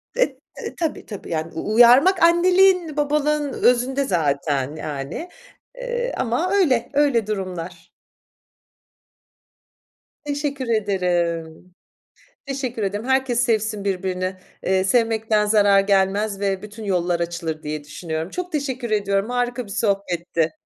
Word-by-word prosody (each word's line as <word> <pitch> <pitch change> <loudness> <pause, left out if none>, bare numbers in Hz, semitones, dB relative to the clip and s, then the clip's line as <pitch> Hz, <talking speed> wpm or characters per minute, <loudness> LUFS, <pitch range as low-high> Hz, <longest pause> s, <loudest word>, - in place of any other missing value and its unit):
e - - +1 0.3
e - - -6
tabii, 325 -4 -3
tabii 205 -4 -9
yani 160 0 -3
u 210 +6 -3
uyarmak 265 - +6
anneliğin 355 -2 +4
babalığın 295 0 0
özünde 250 +3 +2
zaten, 145 - 0
yani, 150 - -5 0.5
eee, - - -3
ama 260 +11 0
öyle, 260 - +2
öyle 275 -7 +2
durumlar. 180 -4 -5 2.3
Teşekkür 285 -3 -3
ederim. 180 -5 -1 0.7
Teşekkür 260 -5 -3
ederim. 205 +4 -2
Herkes 265 -2 +1
sevsin 215 -3 0
birbirini, 185 -1 -2 0.3
eee, 190 0 +2
sevmekten 220 0 +2
zarar 205 -2 +4
gelmez 195 +1 +1
ve 195 -2 -1
bütün 210 +1 -9
yollar 175 -3 0
açılır 170 -2 -4
diye 150 0 -4
düşünüyorum. 160 +3 -5
Çok 360 0 -5
teşekkür 260 -6 -3
ediyorum 200 +1 0
harika 245 -1 -1
bir 200 - -11
sohbetti. 175 -6 -1
210 Hz, 115 wpm, -22 LUFS, 180-265 Hz, 2.3 s, uyarmak